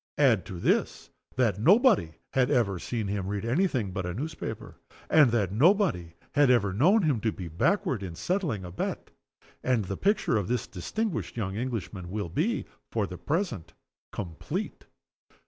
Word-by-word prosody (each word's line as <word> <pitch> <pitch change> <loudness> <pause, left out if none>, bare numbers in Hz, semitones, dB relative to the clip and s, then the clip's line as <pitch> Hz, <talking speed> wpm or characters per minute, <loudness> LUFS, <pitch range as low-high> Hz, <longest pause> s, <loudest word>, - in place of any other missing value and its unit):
Add 125 -9 +3
to 95 -5 -6
this, - - 0 0.2
that 95 - +1
nobody 195 - +4 0.2
had 125 -1 +3
ever 100 -7 +1
seen 115 +3 -3
him 100 -1 -2
read 100 +1 -3
any 150 +12 +2
thing 115 - -2
but 95 0 -3
a 90 0 -4
newspaper, 155 +7 -6 0.3
and 150 -5 +7
that 105 -5 +1
nobody 130 - +2 0.2
had 145 -2 +4
ever 105 -6 +3
known 185 - +4
him 145 -8 +2
to 110 - +1
be 90 -4 -7
backward 110 - 0
in 90 -4 -6
settling 155 - -1
a 90 - -7
bet 90 - -4 0.5
and 125 -5 +1
the 95 +1 -4
picture 200 - +2
of 100 - -1
this 120 0 -1
distinguished 185 - -3
young 95 -4 -2
Englishman 110 -6 -4
will 100 -2 -3
be, 180 - 0 0.3
for 110 -3 0
the 90 -2 -8
present, 145 - -2 0.4
complete. 85 -6 -5
110 Hz, 165 wpm, -28 LUFS, 95-150 Hz, 0.5 s, and